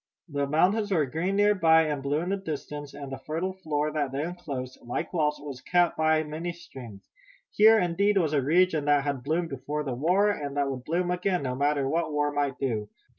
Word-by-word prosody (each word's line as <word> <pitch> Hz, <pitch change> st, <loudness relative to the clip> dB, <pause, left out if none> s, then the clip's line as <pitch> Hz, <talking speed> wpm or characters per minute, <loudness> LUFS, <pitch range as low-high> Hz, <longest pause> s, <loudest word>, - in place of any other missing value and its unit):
The 140 Hz, -1 st, -1 dB
mountains 190 Hz, +9 st, +2 dB
were 160 Hz, -6 st, +3 dB
green 165 Hz, +9 st, -2 dB
near 205 Hz, +1 st, +4 dB
by 160 Hz, -4 st, +5 dB
and 150 Hz, -3 st, -2 dB
blue 145 Hz, +3 st, 0 dB
in 175 Hz, -, -3 dB
the 195 Hz, -, +1 dB
distance, 150 Hz, -5 st, -6 dB
and 140 Hz, -2 st, -8 dB
the 135 Hz, -, -5 dB
fertile 170 Hz, +5 st, -3 dB
floor 155 Hz, -5 st, -2 dB
that 145 Hz, -3 st, -1 dB
they 140 Hz, +2 st, -2 dB
enclosed, 145 Hz, -7 st, -6 dB
like 120 Hz, +8 st, -4 dB
walls, 150 Hz, -3 st, +1 dB
was 140 Hz, -3 st, -8 dB
cut 175 Hz, +3 st, +2 dB
by 155 Hz, 0 st, +2 dB
many 160 Hz, +3 st, -5 dB
streams. 125 Hz, -11 st, -12 dB, 0.4 s
Here, 220 Hz, +2 st, +6 dB
indeed, 200 Hz, +3 st, +2 dB
was 160 Hz, -5 st, +1 dB
a 145 Hz, -, +3 dB
region 160 Hz, +1 st, +2 dB
that 145 Hz, -1 st, +3 dB
had 140 Hz, -2 st, -2 dB
bloomed 160 Hz, +5 st, -1 dB
before 145 Hz, +3 st, -4 dB
the 135 Hz, -3 st, -3 dB
war, 180 Hz, +11 st, +2 dB
and 145 Hz, -7 st, -5 dB
that 140 Hz, -1 st, +1 dB
would 130 Hz, -1 st, -7 dB
bloom 175 Hz, +3 st, 0 dB
again, 180 Hz, -2 st, 0 dB
no 130 Hz, -1 st, -2 dB
matter 140 Hz, +1 st, +1 dB
what 160 Hz, +2 st, -1 dB
war 145 Hz, 0 st, 0 dB
might 145 Hz, -2 st, -1 dB
do. 110 Hz, -6 st, -2 dB
150 Hz, 215 wpm, -27 LUFS, 140-175 Hz, 0.4 s, Here